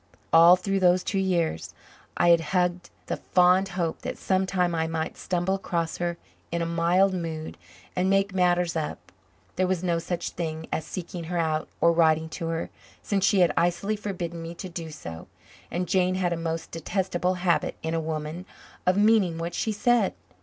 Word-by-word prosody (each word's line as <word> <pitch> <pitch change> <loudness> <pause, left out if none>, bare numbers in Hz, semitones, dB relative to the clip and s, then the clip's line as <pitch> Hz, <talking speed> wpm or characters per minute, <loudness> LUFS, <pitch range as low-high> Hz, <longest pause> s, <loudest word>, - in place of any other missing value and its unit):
All 170 +2 +9
through 195 +2 -1
those 180 0 +4
two 195 - -1
years 170 - -1 0.4
I 175 - +4
had 170 -1 +6 0.2
hugged 180 0 0 0.2
the - - -3
fond 180 +1 +3
hope 165 -3 -1
that - - -5
sometime 185 -2 +1
I 160 -1 0
might 160 -1 -3
stumble 180 +1 -1
across 170 -4 -2
her 175 -1 -2 0.3
in 170 - -1
a 170 - 0
mild 170 +3 +2
mood 165 -3 -4 0.4
and 185 +1 +1
make 195 0 +2
matters 180 -2 +2
up. 155 - -4 0.5
There 185 - +2
was 185 -1 -1
no 170 -2 +1
such 170 +1 -3
thing 160 -2 -4
as 160 - -2
seeking 175 -1 -6
her 175 +2 -3
out 160 -2 0
or 170 - +5
writing 160 -1 +3
to 165 +1 -5
her, 165 0 -3 0.3
since 195 -2 0
she 195 -1 +4
had 175 - +4
icily 175 +5 +1
forbidden 180 -5 -5
me 165 +1 -7
to 185 +2 -7
do 170 -2 -6
so, 85 - -9 0.4
and 180 +1 -2
Jane 185 +1 +2
had 180 -2 0
a - - -1
most 165 0 -4
detestable 180 +2 -1
habit 180 -1 +1
in 160 0 -2
a 165 - 0
woman 155 +3 -4 0.4
of 185 +1 +4
meaning 205 -5 +4
what 170 +1 -4
she 220 - -1
said. 225 0 +2
175 Hz, 185 wpm, -26 LUFS, 165-185 Hz, 0.5 s, All